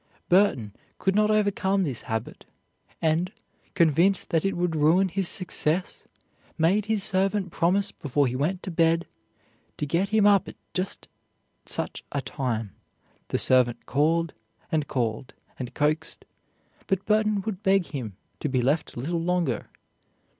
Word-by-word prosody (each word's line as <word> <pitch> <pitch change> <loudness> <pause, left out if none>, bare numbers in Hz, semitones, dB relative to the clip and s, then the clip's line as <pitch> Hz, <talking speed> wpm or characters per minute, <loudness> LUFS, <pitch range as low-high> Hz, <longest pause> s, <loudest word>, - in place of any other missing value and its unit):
Burton 175 - +3 0.2
could 190 - +1
not 210 +1 +3
overcome 200 -2 +2
this 135 -9 -2
habit, 110 0 -4 0.6
and, 165 +3 +1 0.4
convinced 170 +2 +3
that 165 -2 +2
it 195 -2 0
would 175 -2 0
ruin 165 +6 +4
his 190 0 0
success, 180 -1 -1 0.5
made 185 +6 +3
his 215 -2 +1
servant 195 -1 0
promise 185 +5 +1
before 145 0 0
he 125 -1 -1
went 170 +8 -1
to 185 - -5
bed 165 0 +2 0.7
to - - -2
get 170 +7 0
him 215 -1 +3
up 200 -2 +5
at - - -8 0.2
just 185 0 -3 0.6
such - - -3
a 140 - -1
time; 115 -7 -3 0.5
the - - -1
servant 125 -2 +2
called, 160 +4 +1 0.4
and 155 -3 0
called, 120 0 -2 0.2
and 125 -2 -6
coaxed; 155 +2 -1 0.6
but 195 -1 0
Burton 215 -1 +2
would 200 -1 -5
beg 195 -3 +3
him 115 -10 -6 0.2
to 150 - -2
be 130 -2 +1
left 145 +6 0
a - - -5
little 165 +6 -2
longer. 180 0 -1
170 Hz, 145 wpm, -26 LUFS, 145-195 Hz, 0.7 s, up